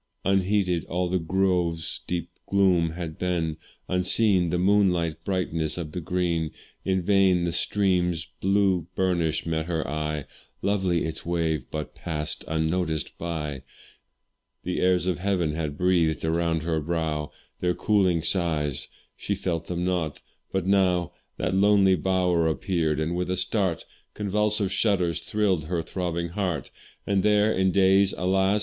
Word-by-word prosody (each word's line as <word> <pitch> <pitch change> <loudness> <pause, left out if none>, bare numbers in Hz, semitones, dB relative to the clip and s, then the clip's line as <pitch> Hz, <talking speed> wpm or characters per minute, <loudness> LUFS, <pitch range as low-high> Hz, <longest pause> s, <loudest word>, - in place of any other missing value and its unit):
Unheeded 95 -2 +2
all 90 +1 -1
the 90 +1 0
grove's 90 -2 0
deep 85 -1 -3 0.2
gloom 95 -4 +3
had 80 -2 -6
been, 85 -3 -1 0.3
Unseen 90 0 +2
the 90 - 0
moonlight 90 -4 +2
brightness 85 -5 -1
of 80 -3 -5
the 90 - -4
green; 85 -1 -1 0.3
In 95 -1 0
vain 95 -2 +4
the 85 - 0
stream's 90 -3 +1
blue 95 -3 +2
burnish 85 -4 0
met 80 -1 -1
her 80 -3 -2
eye, 75 -1 -3 0.4
Lovely 95 -4 +1
its 80 -1 -4
wave, 85 -2 -1
but 75 -1 -5
pass'd 75 -3 -3
unnoticed 80 0 -1
by: 75 -5 -4 1.0
The 90 - -2
airs 90 -1 +3
of 90 -1 -1
heaven 90 -4 0
had 75 -2 -3
breath'd 85 -4 +2
around 80 0 0
her 80 -1 0
brow 80 -2 -2 0.3
Their 90 -1 0
cooling 95 -6 +2
sighs 80 -7 0 0.3
she 100 - -2
felt 85 -4 -2
them 90 0 -2
not 85 -5 -1 0.3
but 95 -2 -1
now 90 -3 +2 0.3
That 90 - -1
lonely 100 0 +5
bower 90 -1 +1
appeared, 80 -2 0
and 80 +2 -1
with 90 0 -2
a 90 - 0
start 95 -2 0 0.3
Convulsive 105 -1 0
shudders 90 -6 +1
thrill'd 95 -7 0
her 85 0 -2
throbbing 85 0 -3
heart. 90 -5 -3 0.3
For 100 - -1
there, 105 +2 +3
in 95 0 +2
days, 95 +1 +4
alas! 95 +3 +2
90 Hz, 145 wpm, -26 LUFS, 80-95 Hz, 1.0 s, lonely